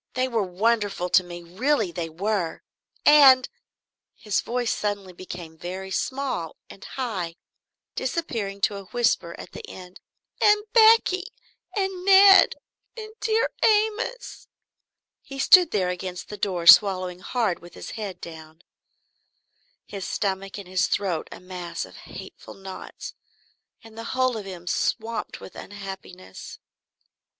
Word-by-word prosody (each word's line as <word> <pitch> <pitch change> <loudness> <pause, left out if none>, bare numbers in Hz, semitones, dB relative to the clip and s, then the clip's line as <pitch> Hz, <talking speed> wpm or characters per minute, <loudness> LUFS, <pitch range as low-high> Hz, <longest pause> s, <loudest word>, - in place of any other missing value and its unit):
They 255 +1 +1
were 230 -3 0
wonderful 200 -1 0
to 185 - +4
me, 175 -1 -9
really 215 - 0
they 170 -1 -4
were! 180 0 -2 0.4
And" 275 -4 +7 0.7
his 210 -3 -1
voice 245 -1 -1
suddenly 200 -3 -3
became 175 -3 -9
very 190 +2 -6
small 255 - -3 0.2
and 195 - -13
high, 195 -10 -4 0.6
disappearing 230 -9 -3
to 200 0 +1
a 200 - -9
whisper 240 +4 0
at - - -10
the - - -9
end 180 0 -11 0.4
"and 420 0 +5
Becky 440 -5 +5 0.5
and 385 -2 -2
Ned 390 0 +7 0.4
and 435 -1 -8
dear 445 0 +1
Amos 440 +3 0 0.4
" - - -66 0.3
He 275 - -10
stood 355 +5 +7
there 185 -4 0
against 180 0 -6
the 210 - -6
door, 180 -5 -2
swallowing 185 0 +6
hard 215 -2 -1
with 175 0 -15
his - - -8
head 200 -5 -6
down, 160 0 -11 1.2
his 200 -2 -7
stomach 195 0 -3
and 200 -3 -9
his 185 -1 +1
throat 180 -6 -1
a - - -9
mass 180 -1 -6
of - - -15
hateful - - -11
knots 190 -1 -9 0.7
and 225 -1 -15
the 225 - -7
whole 255 -1 +2
of 215 -3 -6
him 180 -3 -9
swamped 225 +5 -2
with - - -12
unhappiness. 190 - -9
200 Hz, 135 wpm, -24 LUFS, 180-260 Hz, 1.2 s, And